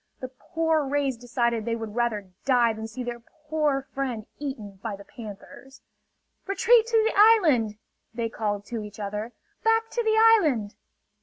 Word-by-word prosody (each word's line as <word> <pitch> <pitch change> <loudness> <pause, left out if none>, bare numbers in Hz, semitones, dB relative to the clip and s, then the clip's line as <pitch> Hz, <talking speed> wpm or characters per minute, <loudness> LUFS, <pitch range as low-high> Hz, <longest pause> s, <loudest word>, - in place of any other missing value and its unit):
The 255 - -6
poor 320 +4 -1
rays 275 -1 0
decided 235 -1 -1
they 230 +1 -1
would 225 -2 -6
rather 215 -5 -1
die 245 -4 +3
than 220 0 -6
see 240 +3 -6
their 240 -1 -5
poor 300 +1 -2
friend 250 -6 -3
eaten 220 -9 -6
by 215 -1 -4
the 200 - -12
panthers. 230 +5 -11 0.6
"Retreat 450 +4 +4
to 465 -1 +2
the 445 - +1
island!" 320 - +5 0.3
they 230 0 -2
called 205 -2 -3
to 230 -2 -5
each 210 0 -10
other. 210 +3 -4 0.3
"Back 450 0 +2
to 480 - 0
the 440 0 +2
island!" 315 - +4
245 Hz, 160 wpm, -26 LUFS, 220-315 Hz, 0.6 s, island